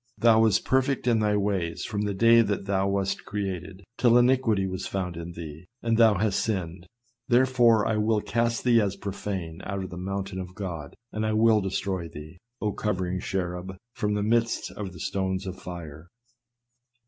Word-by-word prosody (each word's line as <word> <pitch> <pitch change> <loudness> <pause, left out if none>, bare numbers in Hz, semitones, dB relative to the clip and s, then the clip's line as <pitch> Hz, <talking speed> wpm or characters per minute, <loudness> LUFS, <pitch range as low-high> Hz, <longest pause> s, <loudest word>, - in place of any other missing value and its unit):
Thou 115 -1 +5
wast 110 -3 +3
perfect 130 0 +1
in 120 -2 +3
thy 105 -1 +2
ways 95 -5 -1
from 105 -2 -3
the 105 -1 -1
day 115 +3 +6
that 100 -3 -1
thou 100 0 +1
wast 100 0 -1
created, 95 -2 -5 0.2
till 120 -1 +5
iniquity 120 -5 +3
was 95 0 -4
found 90 -3 -3
in 85 +1 -7
thee, 80 0 -9 0.2
and 115 -1 +2
thou 110 -2 +6
hast 105 0 +1
sinned; 95 -4 -3 0.4
therefore, 120 -3 +4
I 110 - +1
will 105 0 +2
cast 115 +2 -1
thee 120 -2 +5
as 100 -1 -1
profane 95 -4 -5
out 95 0 -3
of 95 - -7
the 90 - -7
mountain 95 +1 -4
of 90 -1 -7
God: 85 -8 -6 0.2
and 110 - -3
I 110 0 0
will 110 0 +4
destroy 95 -2 -2
thee, 75 +4 -11 0.2
O 105 - -1
covering 95 -3 -2
cherub, 95 -1 -4 0.2
from 105 0 -1
the 105 - 0
midst 115 +2 +1
of 100 -3 -6
the 85 - -12
stones 95 +1 -2
of 95 0 -7
fire." 85 -3 -8
100 Hz, 185 wpm, -26 LUFS, 95-110 Hz, 0.4 s, day